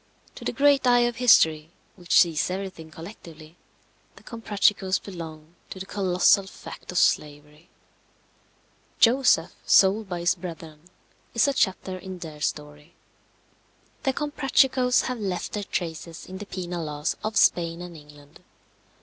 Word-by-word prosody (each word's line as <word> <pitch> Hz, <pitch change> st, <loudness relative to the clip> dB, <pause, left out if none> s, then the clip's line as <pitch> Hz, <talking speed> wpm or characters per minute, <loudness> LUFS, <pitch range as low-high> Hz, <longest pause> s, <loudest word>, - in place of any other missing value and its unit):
To -, -, -11 dB
the -, -, -1 dB
great 280 Hz, -2 st, +3 dB
eye 245 Hz, 0 st, +5 dB
of 240 Hz, -1 st, 0 dB
history, 160 Hz, -11 st, +4 dB, 0.3 s
which 175 Hz, -3 st, +3 dB
sees 165 Hz, -2 st, +1 dB
everything 185 Hz, -4 st, -6 dB
collectively, 165 Hz, -2 st, -12 dB, 0.6 s
the -, -, -17 dB
Comprachicos 205 Hz, -4 st, 0 dB
belong 160 Hz, -4 st, -10 dB, 0.2 s
to 190 Hz, -, -8 dB
the 190 Hz, -, -6 dB
colossal 190 Hz, 0 st, +2 dB
fact -, -, -10 dB
of 180 Hz, -, -4 dB
slavery. 150 Hz, +1 st, -1 dB, 1.3 s
Joseph 235 Hz, -8 st, +4 dB
sold 200 Hz, +1 st, +4 dB
by 175 Hz, -2 st, -4 dB
his 175 Hz, -, +3 dB
brethren 165 Hz, -2 st, -10 dB, 0.5 s
is 230 Hz, -, +4 dB
a 280 Hz, -, +1 dB
chapter 190 Hz, -5 st, -1 dB
in 185 Hz, 0 st, -8 dB
their 155 Hz, -4 st, -10 dB
story. 150 Hz, +2 st, -5 dB, 1.1 s
The 270 Hz, -, +1 dB
Comprachicos 270 Hz, -3 st, +2 dB
have 250 Hz, -2 st, -4 dB
left 190 Hz, -4 st, -3 dB
their 210 Hz, -, -4 dB
traces 165 Hz, -2 st, -5 dB
in 190 Hz, 0 st, -9 dB
the 205 Hz, -, -8 dB
penal 175 Hz, -3 st, -5 dB
laws 150 Hz, 0 st, -3 dB
of 215 Hz, 0 st, -2 dB
Spain 170 Hz, -1 st, +2 dB
and 175 Hz, -1 st, -10 dB
England. 145 Hz, -1 st, -16 dB
180 Hz, 140 wpm, -25 LUFS, 160-215 Hz, 1.3 s, eye